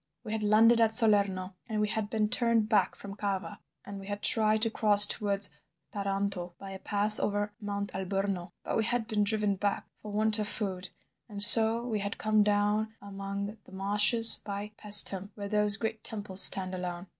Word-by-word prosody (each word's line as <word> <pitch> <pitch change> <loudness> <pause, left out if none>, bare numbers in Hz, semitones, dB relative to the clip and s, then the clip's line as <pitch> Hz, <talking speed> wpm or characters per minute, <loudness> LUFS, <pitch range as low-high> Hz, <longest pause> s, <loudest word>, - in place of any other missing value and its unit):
We 215 - -9
had 220 0 -5
landed 225 +3 +2
at 220 -1 0
Salerno, 200 -5 +2 0.2
and 215 -1 -4
we 210 - -1
had 210 0 -5
been 215 -1 -2
turned 230 -1 -1
back 210 -4 -1
from 200 -1 -11
Cava, 200 0 -6 0.3
and 200 -1 -10
we 195 - -13
had 205 0 -8
tried 215 -1 +1
to 225 - +1
cross 210 -2 +5
towards 200 -3 0 0.4
Taranto 195 -3 -5
by 195 -1 -12
a 190 - -10
pass 210 +2 +4
over 205 0 -4
Mount 200 -1 -6
Alburno, 190 -1 -5
but - - -4
we 225 - -1
had 235 0 -2
been 215 -2 -2
driven 210 -1 -1
back 200 +1 -4 0.2
for 210 - -10
want 215 +1 -1
of 210 - -4
food, 190 -4 -5 0.4
and 205 -1 -10
so 225 +2 +2
we 220 -4 -4
had 200 0 -6
come 215 0 -1
down 210 +1 -2
among 200 +1 -8
the - - -19
marshes 210 +4 +3
by 205 +1 -8
Paestum, 200 -2 +6
where 200 -1 -8
those 210 -1 0
great 220 -1 -6
temples 200 -3 +2
stand 185 -1 +4
alone. 180 -1 -7
205 Hz, 190 wpm, -27 LUFS, 200-215 Hz, 0.4 s, Paestum